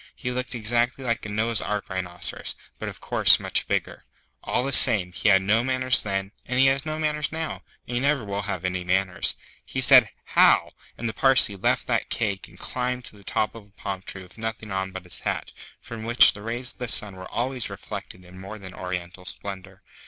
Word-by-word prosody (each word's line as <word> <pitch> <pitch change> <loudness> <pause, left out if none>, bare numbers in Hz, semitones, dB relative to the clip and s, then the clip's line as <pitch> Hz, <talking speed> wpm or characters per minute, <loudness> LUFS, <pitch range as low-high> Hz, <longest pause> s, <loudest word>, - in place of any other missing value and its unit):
He 125 - -5
looked 125 0 -2
exactly 120 +3 0
like 115 -3 -2
a - - -8
Noah's 110 +1 -1
Ark 105 -1 -4
Rhinoceros, 90 -2 -1 0.2
but - - -5
of - - -11
course - - +5
much - - -1
bigger. - - -3 0.4
All 125 - -1
the 135 - -2
same, 105 -10 +8
he 100 +4 0
had 95 -1 +4
no 110 +4 +2
manners 130 0 +3
then, 95 -1 -4 0.2
and 125 - -2
he 135 - +5
has 135 +2 +1
no 155 0 -3
manners 150 -1 -2
now, 160 0 -5 0.3
and 120 - -3
he - - +1
never 140 -3 0
will 100 0 -4
have 95 -3 -5
any 90 0 -2
manners. 90 +1 +1 0.3
He 130 - -6
said, 125 -4 +6
'How!' - - +3 0.3
and 115 - -4
the 110 - -4
Parsee 135 -6 +5
left 95 - 0
that - - -1
cake 100 -5 -3
and - - -19
climbed 125 0 -4
to - - -7
the 100 - -16
top 105 - -2
of 110 -3 -13
a 100 - -30
palm 95 -2 -5
tree 95 0 -9
with 95 +4 -18
nothing 110 -1 -5
on 95 0 -3
but 95 -1 -8
his 90 - -8
hat, - - -4 0.3
from 115 -1 -9
which 120 +2 +7
the 100 - -8
rays 120 +3 -4
of - - -29
the 125 - -3
sun 105 -4 +1
were 95 0 -10
always 125 0 -3
reflected 90 0 -9
in 90 +1 -14
more 100 +3 -9
than 95 -3 -10
oriental 90 0 -7
splendour. 95 0 -9
110 Hz, 220 wpm, -24 LUFS, 95-125 Hz, 0.4 s, same